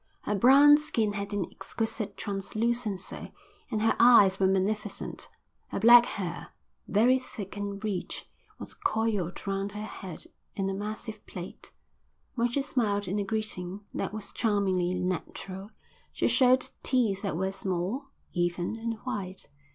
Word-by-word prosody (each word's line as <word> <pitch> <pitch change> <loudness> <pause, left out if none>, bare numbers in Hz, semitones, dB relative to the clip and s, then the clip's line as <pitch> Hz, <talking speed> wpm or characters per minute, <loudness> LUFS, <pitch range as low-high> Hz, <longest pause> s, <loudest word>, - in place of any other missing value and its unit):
Her 210 - -2
brown 280 +8 +7
skin 225 -9 0
had 200 0 -4
an 205 -3 -1
exquisite 220 -2 -3
translucency 215 +1 -2 0.4
and 215 -3 -1
her 225 - +3
eyes 210 -6 +7
were 190 - +4
magnificent. 195 +2 -2 0.4
Her - - -3
black 240 +1 +8
hair, 175 -4 -4 0.4
very 245 +6 +4
thick 205 -6 -8
and 200 0 -4
rich, 200 -4 -3 0.3
was - - -6
coiled 220 - -1
round 195 0 -2
her 210 0 -5
head 190 -5 -8 0.3
in 195 -1 -1
a - - -2
massive 215 +2 -5
plait. 180 -1 -8 0.6
When 240 -1 +1
she 275 +3 0
smiled 210 -7 0
in 195 +3 -1
a - - 0
greeting 200 -3 -3
that - - -2
was 215 -1 -6
charmingly 195 -5 +1
natural, 185 +2 -4 0.4
she - - 0
showed 255 0 +4
teeth 225 -7 +1
that 195 -6 -2
were 190 +2 0
small, 195 - -2 0.3
even, 175 +4 -1
and 230 0 -2
white. 195 -7 -5
205 Hz, 145 wpm, -29 LUFS, 190-225 Hz, 0.6 s, black